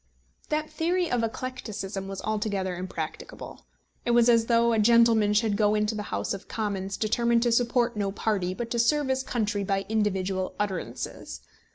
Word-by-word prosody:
That 305 0 0
theory 345 +3 0
of 245 - +2
eclecticism 215 -5 -4
was 195 -1 -6
altogether 205 -4 -1
impracticable. 175 - -7 0.4
It - - -3
was 240 0 +5
as 230 -1 +4
though 235 0 +3
a 225 - +2
gentleman 225 -1 +5
should 215 -1 +2
go 210 +1 +3
into 210 +1 +1
the 215 - -3
House - - -2
of 195 - -8
Commons 195 -3 -3
determined 235 +2 +2
to 240 - +2
support 240 0 +2
no 200 -2 -1
party, 195 -3 -1
but 235 +1 -5
to 235 - 0
serve 290 +4 +2
his 265 0 +1
country 210 -5 -1
by 195 0 -1
individual 190 -3 -1
utterances. 200 -4 -4
215 Hz, 170 wpm, -27 LUFS, 195-235 Hz, 0.4 s, was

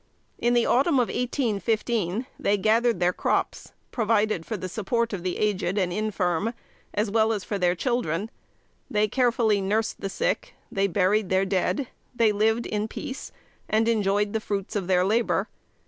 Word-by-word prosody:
In 240 +1 +2
the 240 - +3
autumn 280 +5 +3
of 250 -3 +2
1815, 225 - -1
they 205 +1 +2
gathered 225 +1 +2
their 180 0 +2
crops, - - -1 0.2
provided 215 -6 +1
for 220 - -3
the 185 - -5
support 230 +4 -1
of 190 - -3
the 180 0 -2
aged 200 -2 0
and 180 -3 +1
infirm, 210 0 -1 0.4
as 210 0 -1
well 220 0 +3
as 210 -3 -2
for 205 - -3
their 180 -1 +2
children. 215 - -1 0.6
They 210 0 +2
carefully 230 -3 +2
nursed 215 +3 -1
the 195 - -2
sick; - - -2 0.2
they 195 0 +1
buried 200 +2 +1
their 190 +1 +2
dead; 195 +8 0 0.3
they 230 -3 +4
lived 220 +3 +1
in 210 0 -2
peace, 260 +4 -7 0.4
and 220 +1 +2
enjoyed 205 -2 +1
the 220 - +1
fruits 200 0 -3
of 195 -4 -1
their 180 -1 +3
labor. 225 +4 +1
210 Hz, 165 wpm, -25 LUFS, 195-230 Hz, 0.6 s, they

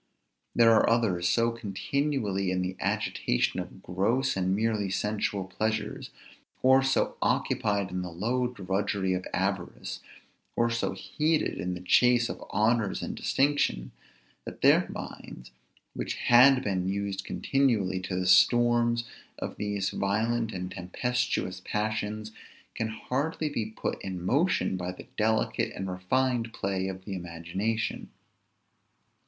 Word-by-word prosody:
There 115 -1 +6
are 110 - +5
others 100 -7 +2
so 115 +5 +2
continually 110 -2 -1
in 90 0 0
the 90 0 -3
agitation 60 - 0
of - - -8
gross 115 +9 +1
and 95 0 +1
merely 110 -2 0
sensual 105 0 -1
pleasures, 110 +3 -2 0.5
or 130 +1 +6
so 135 0 +1
occupied 100 -3 0
in 90 0 -2
the 90 - -5
low 120 +9 0
drudgery 100 -3 -1
of 90 0 -3
avarice, 95 -1 -2 0.6
or 115 0 +2
so 115 -4 -1
heated 155 +10 0
in 90 +1 -2
the 90 - -8
chase 120 +5 +4
of - - -6
honors 110 0 +1
and - - -3
distinction, 135 - +1 0.5
that - - -9
their - - +5
minds, 60 0 -8 0.4
which - - -3
had 130 +2 +6
been 95 -2 -1
used 100 0 -2
continually 110 -10 +1
to 90 0 -4
the 90 0 -1
storms 120 +5 +4 0.3
of - - -5
these 100 -2 -1
violent 110 +3 0
and 90 -1 -5
tempestuous 95 0 -2
passions, 110 0 -2 0.4
can 110 - -2
hardly 140 +8 -2
be 115 -7 -2
put 110 - -4
in 95 -2 -4
motion 140 - +2
by 90 0 -3
the 90 - -11
delicate 110 0 +1
and 95 0 -4
refined 115 +6 0
play 95 -1 -2
of 95 0 -6
the 100 - -5
imagination. 90 +5 -3
105 Hz, 135 wpm, -28 LUFS, 95-120 Hz, 0.6 s, There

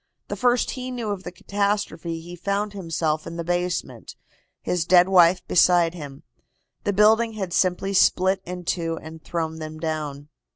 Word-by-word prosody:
The - - -2
first 245 -1 +2
he 255 -1 -5
knew 240 -4 -3
of 200 -2 -4
the 175 - -7
catastrophe 200 -4 -2
he 175 +2 -9
found 200 +3 -2
himself 165 -4 -2
in 170 - -7
the 170 - -4
basement, 175 +1 -3 0.4
his 180 -2 -1
dead 175 +1 +5
wife 180 -1 +5
beside 175 -2 +4
him. 145 -5 -9 0.6
The 205 - +2
building 220 +3 +4
had 190 -5 -4
simply 185 +2 +1
split 190 0 +3
in 180 0 -7
two, 165 -1 -1
and 160 0 -11
thrown 160 -1 -3
them 155 0 -7
down." 150 -3 -4
175 Hz, 165 wpm, -24 LUFS, 165-200 Hz, 0.6 s, dead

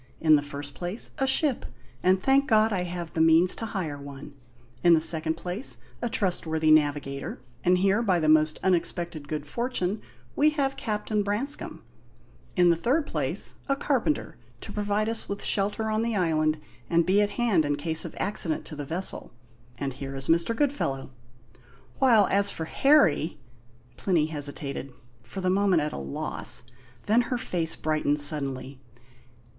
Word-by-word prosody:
In 155 -1 +5
the 145 - +2
first 145 0 -7
place, 175 - -5
a 270 - +1
ship 265 0 +2 0.4
and 185 +1 +3
thank 270 +6 +3
God 220 -1 +3
I 180 -2 -1
have 175 -1 -6
means 165 +2 +5
to 225 - -4
hire 165 -9 -4
one, 140 +1 -10 0.5
in 175 -1 +6
the - - +3
second 160 0 +4
place, 180 +9 -4 0.2
a 240 - -1
trustworthy 160 -7 0
navigator 145 -3 +1 0.2
and 180 +1 +4
here, 195 +4 +2
by 190 -6 +2
the 155 - 0
most 155 0 +4
unexpected 170 -4 -1
good 150 -1 -4
fortune, 210 - -2 0.3
we 300 +1 +4
have 270 -1 0
Captain 210 -1 -2
Branscome; 210 +8 -3 0.7
in 175 -1 +5
the - - +3
third 265 - +1
place, - - -1 0.2
a 275 - +3
carpenter, 280 +1 -1 0.2
to - - -8
provide 210 +1 -1
us 225 0 -1
with 200 0 -4
shelter 210 +2 0
on 215 0 +1
the 230 -1 -1
island 155 -4 +1 0.3
and 170 -1 +3
be 195 +4 +3
at 205 - +1
hand 225 -9 +3
in 145 0 0
case 160 +2 -3
of - - -8
accident 180 -5 -1
to 155 - -8
the 145 -1 -5
vessel 180 +5 -1 0.5
and 135 0 -3
here 135 +1 -7
is 135 0 -5
Mr. 170 +7 +2
Goodfellow; 225 - -1 0.9
while 230 -6 +5
as 200 +1 +3
for 160 - -4
Harry 175 - +3 0.3
" 120 +1 -30
Plinny 170 -6 +1
hesitated, 145 -2 -5 0.3
for 195 - -7
the 185 0 +1
moment 190 -4 +3
at 150 - -3
a - - -5
loss; 70 - -2 0.4
then 225 +3 +4
her 250 - 0
face 170 -9 -2
brightened 150 -1 0
suddenly. 140 -2 +1
175 Hz, 165 wpm, -26 LUFS, 155-210 Hz, 0.9 s, in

